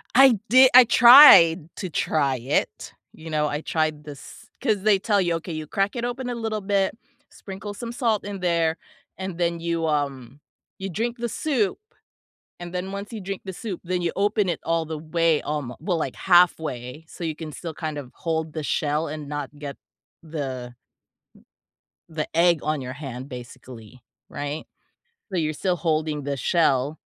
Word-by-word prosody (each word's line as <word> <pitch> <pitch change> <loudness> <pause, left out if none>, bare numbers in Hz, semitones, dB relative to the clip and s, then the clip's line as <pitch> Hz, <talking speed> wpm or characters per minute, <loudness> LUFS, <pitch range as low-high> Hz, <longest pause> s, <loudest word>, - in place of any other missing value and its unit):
I 260 -5 +7
di 260 +1 +7
I 255 - +11
tried 230 - +8
to 185 - -4
try 140 -4 0
it, 130 +5 -2 0.2
you 160 0 -11
know, 150 -1 0
I 150 +1 -3
tried 155 -2 -1
this 145 -2 -12
'cause 215 -6 0
they 205 -3 +4
tell 205 0 +1
you, 170 -3 +1
"Okay, 165 0 -6
you 155 -1 -5
crack 200 +3 -1
it 240 0 -2
open 245 +1 -4
a 245 - -3
little 220 -2 -3
bit, 195 +2 0 0.3
sprinkle 200 +1 -8
some 235 +2 -7
salt 230 -4 0
in 200 -1 -6
there, 170 -2 +1 0.4
and 190 -2 -5
then 170 -1 0
you, 165 -1 -2
um 140 -3 -3 0.4
you 195 0 -5
drink 230 +7 -3
the 235 0 -3
soup," 245 -10 -1 0.8
and 175 0 -8
then 185 +2 -4
once 200 +3 -7
you 215 - -6
drink 195 0 -5
the 190 - -6
soup, 195 -3 -6
then 180 0 -2
you 170 - -1
open 205 -1 +1
it 165 - -2
all 165 0 0
the 160 0 -5
way, 165 0 +1
um, 145 -5 -4
well 175 +1 -1
like 135 -5 -3
halfway, 160 -6 +2
so 175 - -10
you 160 -2 -2
can 155 -1 -8
still 165 +1 -7
kind 155 -2 -5
of 130 -3 -10
hold 160 -2 -3
the 155 -2 -4
shell 150 +2 -1
and 150 -1 -6
not 145 -2 -4
get 140 -2 -7 0.5
the 130 -6 -5 1.4
the 155 -1 -4
egg 170 -2 +4
on 155 -1 -1
your 130 0 -6
hand 135 -2 -8
basically, 125 -1 -11 0.3
right? 145 +2 -5 0.7
So, 180 - 0
you're 155 -1 0
still 180 +3 -1
holding 155 -3 -1
the 140 -1 -2
shell, 145 -2 +1
165 Hz, 180 wpm, -24 LUFS, 150-195 Hz, 1.4 s, I